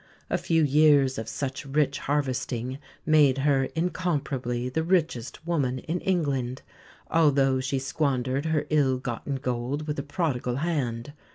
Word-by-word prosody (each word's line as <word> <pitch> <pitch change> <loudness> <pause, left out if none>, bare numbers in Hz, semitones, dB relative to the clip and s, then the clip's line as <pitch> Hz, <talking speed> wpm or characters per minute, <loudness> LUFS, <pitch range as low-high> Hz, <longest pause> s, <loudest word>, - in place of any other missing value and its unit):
A - - +2
few 165 -1 +2
years 145 -3 +4
of 110 - -5
such 135 -1 -4
rich 140 0 0
harvesting 130 -2 -2 0.3
made 150 -4 +5
her 135 -1 +2
incomparably 140 -8 -1
the 130 +6 -1
richest 160 -6 -1
woman 140 -7 0
in 165 +7 -3
England, 140 -9 -1 0.5
although 140 -5 +4
she 135 +1 -1
squandered 135 0 -1
her 155 -2 0
ill 140 -4 +3
gotten 125 +2 -4
gold 130 +3 -2
with 150 -2 -3
a - - 0
prodigal 140 -4 -2
hand. 140 -5 -2
140 Hz, 140 wpm, -26 LUFS, 130-155 Hz, 0.5 s, made